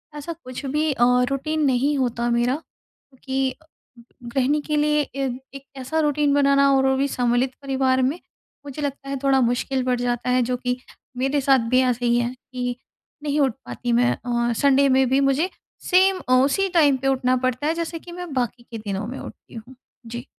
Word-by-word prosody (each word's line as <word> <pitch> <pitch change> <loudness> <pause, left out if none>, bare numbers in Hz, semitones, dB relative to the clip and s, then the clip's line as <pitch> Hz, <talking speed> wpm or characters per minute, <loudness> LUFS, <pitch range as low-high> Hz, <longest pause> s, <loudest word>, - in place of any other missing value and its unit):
ऐसा 295 +3 -5
कुछ 255 +2 -7
भी 300 +3 0
अ, 240 - +1 0.3
रूटीन 310 +3 -2
नहीं 275 +2 +2
होता 240 -2 -1
मेरा, 240 +2 +1
क्योंकि 265 -3 -6 0.7
गृहिणी 265 +5 0
के 300 +1 -2
लिए 300 0 +2
ए 275 0 -1 0.3
एक 275 0 -10
ऐसा 265 +5 -2
रूटीन 295 -1 +2
बनाना 280 -1 +4
और 265 0 +3
वो 265 - +2
भी 275 +1 +1
सम्मिलित 245 0 0
परिवार 265 -1 +1
में, 275 +7 0 0.5
मुझे 285 +1 -7
लगता 280 -1 -4
है 275 - -2
थोड़ा 270 -1 +3
मुश्किल 250 +2 0
बढ़ 250 -1 0
जाता 245 0 -1
है 250 0 +3
जो 250 +1 -1
कि 250 0 -2 0.4
मेरे 270 +3 0
साथ 270 0 +4
भी 255 +1 +4
ऐसे 250 -1 0
ही 240 0 +3
है 240 +1 -1
कि 250 -1 -5 0.5
नहीं 295 0 0
उठ 275 -3 +3
पाती 245 - -4
मैं 245 +1 +3
औ 240 0 +1
संडे 280 0 +4
में 265 0 +4
भी 265 +1 +3
मुझे 275 +6 +2 0.4
सेम 375 +1 +4
अ, - - +4
उसी 275 +10 +3
टाइम 300 -6 +4
पे 270 +1 -3
उठना 255 -1 +2
पड़ता 255 +2 -1
है, 320 - +2
जैसे 335 0 -4
कि 345 - -12
मैं 355 -3 -7
बाकी 245 -2 -2
के 230 - -5
दिनों 205 -1 -4
में 255 +3 -6
उठती - - -12
हूँ। 235 +3 -10 0.3
जी। 240 +2 -7
265 Hz, 195 wpm, -23 LUFS, 250-285 Hz, 0.7 s, बनाना